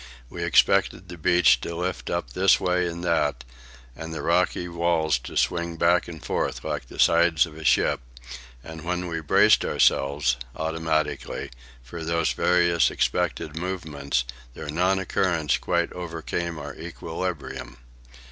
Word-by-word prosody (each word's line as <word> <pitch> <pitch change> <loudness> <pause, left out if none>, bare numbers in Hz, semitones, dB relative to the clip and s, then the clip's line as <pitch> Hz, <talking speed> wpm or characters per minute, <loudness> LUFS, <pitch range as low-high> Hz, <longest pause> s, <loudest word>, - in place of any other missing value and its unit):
We - - -5
expected - - +2
the 85 - -8
beach 75 -7 +4
to 85 - -5
lift 90 +2 -3
up - - -3
this 95 +6 +4
way 90 -1 +1
and 85 0 -6
that, 75 -8 0 0.5
and 80 0 -7
the - - -5
rocky 90 +1 +1
walls 85 -5 +1
to - - -7
swing 85 -1 0
back 85 +2 +3
and 80 -3 -9
forth - - -2
like - - -4
the - - -12
sides 85 -2 +4
of 80 -2 -12
a 80 - -9
ship; - - +3 0.6
and 80 +2 -9
when 90 +1 -2
we 80 -1 -3
braced 75 - +4
ourselves, 70 -1 +2 0.2
automatically, 80 -1 -2 0.3
for 80 +7 -8
these 85 -4 0
various 85 +4 +3
expected 75 - -1
movements, 80 -7 -2 0.3
their 75 -2 -6
non 90 +4 +2
occurrence 85 -5 0
quite 85 -1 -1
overcame 85 -1 -4
our 75 -2 -7
equilibrium. 80 -5 -6
85 Hz, 145 wpm, -25 LUFS, 75-85 Hz, 0.6 s, beach